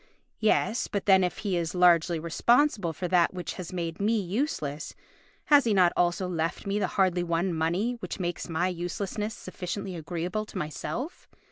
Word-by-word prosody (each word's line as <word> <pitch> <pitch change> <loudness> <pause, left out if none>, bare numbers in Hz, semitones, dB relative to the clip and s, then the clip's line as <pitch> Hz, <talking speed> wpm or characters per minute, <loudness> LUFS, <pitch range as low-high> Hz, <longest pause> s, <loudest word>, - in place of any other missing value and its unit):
Yes, 220 +2 +2
but 200 - -3
then 190 -2 +6
if 180 - -1
he 195 -3 +1
is 170 0 -2
largely 175 -1 +4
responsible 200 - +2
for 180 +3 -4
that 180 0 +3
which 180 - -4
has 185 -3 -7
made 170 -2 -4
me 215 +2 +2
useless, 180 - -3 0.5
has 290 -3 +6
he 220 -3 +2
not 180 -2 +5
also 175 +1 +1
left 165 -2 -2
me 200 +1 0
the - - +1
hardly 185 -2 +3
won 170 +1 0
money 170 +8 0
which 185 -2 -6
makes 175 0 -3
my 165 +2 +1
uselessness 195 +5 -3
sufficiently 185 0 -5
agreeable 175 +6 -3
to - - -8
myself? 155 - -5
180 Hz, 170 wpm, -28 LUFS, 170-205 Hz, 0.5 s, then